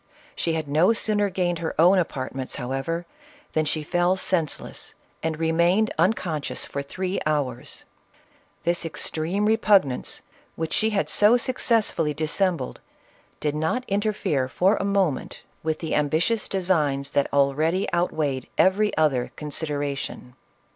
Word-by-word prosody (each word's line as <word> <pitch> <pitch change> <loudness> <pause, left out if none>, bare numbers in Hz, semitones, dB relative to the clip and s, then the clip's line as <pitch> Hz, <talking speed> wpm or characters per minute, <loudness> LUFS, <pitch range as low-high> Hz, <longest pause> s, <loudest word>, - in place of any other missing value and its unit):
She 165 - 0
had 160 -2 -2
no 160 +9 +4
sooner 210 -2 +1
gained 180 -2 -1
her 165 -1 -3
own 180 +4 +6
apartments, 130 -5 -3
however, 135 +7 -3 0.5
than 155 0 +1
she 155 0 -1
fell 175 +3 +2
senseless, 180 -4 -2 0.3
and 160 -1 -2
remained 170 +6 +2
unconscious 170 -5 0
for 140 - -4
three 185 +7 -3
hours. 135 -5 -2 0.8
This 175 0 +1
extreme 165 +4 -1
repugnance, 205 - +2 0.3
which 160 -1 -3
she 220 - +2
had 210 -2 0
so 210 +4 +5
success 235 -3 +1
fully 150 -3 -1
dissembled, 160 - -1 0.6
did 150 -1 -1
not 160 +12 -1
interfere 200 -10 0
for 185 +10 +2
a - - -2
moment 195 -7 -1 0.2
with 160 0 -1
the 160 - -4
ambitious 160 +10 +1
designs 150 -8 0
that 140 - +1
already 150 +6 +2
outweighed 155 -6 -1
every 205 +3 +3
other 140 -6 +2
consideration. 145 -4 -4
165 Hz, 130 wpm, -24 LUFS, 150-190 Hz, 0.8 s, own